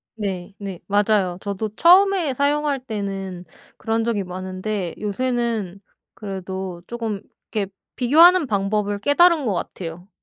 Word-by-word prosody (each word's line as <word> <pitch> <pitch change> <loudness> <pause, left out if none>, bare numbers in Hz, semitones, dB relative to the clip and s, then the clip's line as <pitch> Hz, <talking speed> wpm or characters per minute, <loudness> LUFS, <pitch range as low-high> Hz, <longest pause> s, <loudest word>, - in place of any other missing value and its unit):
네네. 195 -2 -5
맞아요. 205 -3 +2
저도 200 +2 -3
처음에 360 - +5
사용할 285 +1 +1
때는 195 -5 -5 0.3
그런 225 0 -1
적이 220 -4 0
많은데 185 +1 -4
요새는 220 -3 -2 0.4
그래도 190 -3 -6
쪼금 225 -4 -4 0.3
이렇게 200 -3 -2 0.2
비교하는 325 +6 +6
방법을 205 -1 0
깨달은 310 - +4
것 205 - +1
같아요. 175 0 -6
205 Hz, 275 characters per minute, -22 LUFS, 190-250 Hz, 0.4 s, 비교하는